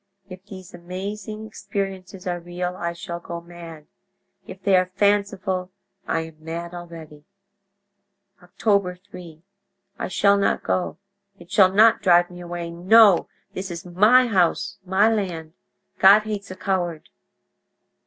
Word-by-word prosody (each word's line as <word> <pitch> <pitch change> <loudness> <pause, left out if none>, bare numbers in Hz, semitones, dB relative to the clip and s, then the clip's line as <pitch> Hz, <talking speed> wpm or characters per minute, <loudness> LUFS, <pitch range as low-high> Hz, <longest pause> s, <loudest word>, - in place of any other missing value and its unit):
If 185 -1 -11
these 185 -2 -11
amazing 200 +5 -7
experiences 195 -3 -6
are 175 -1 -2
real 175 +1 -5
I 170 -2 -3
shall 170 0 -7
go 170 0 -7
mad; 170 -2 -12 0.6
if - - -10
they 195 -1 +3
are 185 0 +3
fanciful 200 -2 0 0.4
I 165 - 0
am 160 -1 -11
mad 170 +2 -6
already. 165 -4 -10 1.2
"Oct. 175 0 -22 0.5
3.—I 195 +3 -12
shall 200 +2 +3
not 200 - 0
go—it 200 -1 -6
shall 190 -2 +5
not 215 +3 +5
drive 175 -1 +4
me 180 0 -10
away. 175 -1 -6
No, 195 +3 +5 0.3
this 190 +1 -5
is 170 +2 -7
my 210 +9 +5
house, 185 -7 0
my 190 +3 +3
land. 180 -8 -2 0.5
God 200 +2 +7
hates 210 -2 -5
a 185 - -7
coward.... 175 -5 -2
185 Hz, 130 wpm, -23 LUFS, 175-200 Hz, 1.2 s, God